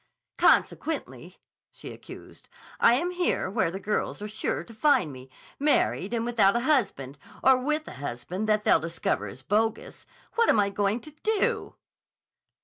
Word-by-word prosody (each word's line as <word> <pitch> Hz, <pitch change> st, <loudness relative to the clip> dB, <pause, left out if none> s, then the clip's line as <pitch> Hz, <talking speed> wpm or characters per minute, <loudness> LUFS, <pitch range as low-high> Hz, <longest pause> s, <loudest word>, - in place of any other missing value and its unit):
"Consequently," 320 Hz, -, +1 dB, 0.3 s
she -, -, -10 dB
accused, -, -, -13 dB, 0.3 s
"I 235 Hz, -, +6 dB
am 345 Hz, +7 st, -1 dB
here 355 Hz, -, -1 dB
where 215 Hz, -5 st, +1 dB
the 190 Hz, +3 st, -6 dB
girls 210 Hz, +2 st, -2 dB
are 210 Hz, -, -5 dB
sure 215 Hz, +1 st, -3 dB
to 230 Hz, -, -14 dB
find 220 Hz, -, +2 dB
me, 130 Hz, 0 st, -12 dB, 0.3 s
married 280 Hz, -8 st, +1 dB
and 230 Hz, -1 st, -1 dB
without 220 Hz, -4 st, +3 dB
a 235 Hz, -, +1 dB
husband, 200 Hz, -, 0 dB, 0.2 s
or 265 Hz, 0 st, +7 dB
with 305 Hz, +4 st, -1 dB
a -, -, -7 dB
husband 145 Hz, -, -4 dB
that 210 Hz, 0 st, +2 dB
they'll -, -, +4 dB
discover 165 Hz, -10 st, -2 dB
is 125 Hz, +7 st, -10 dB
bogus. 225 Hz, -, -1 dB, 0.3 s
What 465 Hz, 0 st, +2 dB
am 215 Hz, -, +4 dB
I 200 Hz, -1 st, +2 dB
going 205 Hz, +3 st, 0 dB
to 305 Hz, -, -11 dB
do?" 415 Hz, +8 st, -1 dB
215 Hz, 160 wpm, -27 LUFS, 190-285 Hz, 0.3 s, or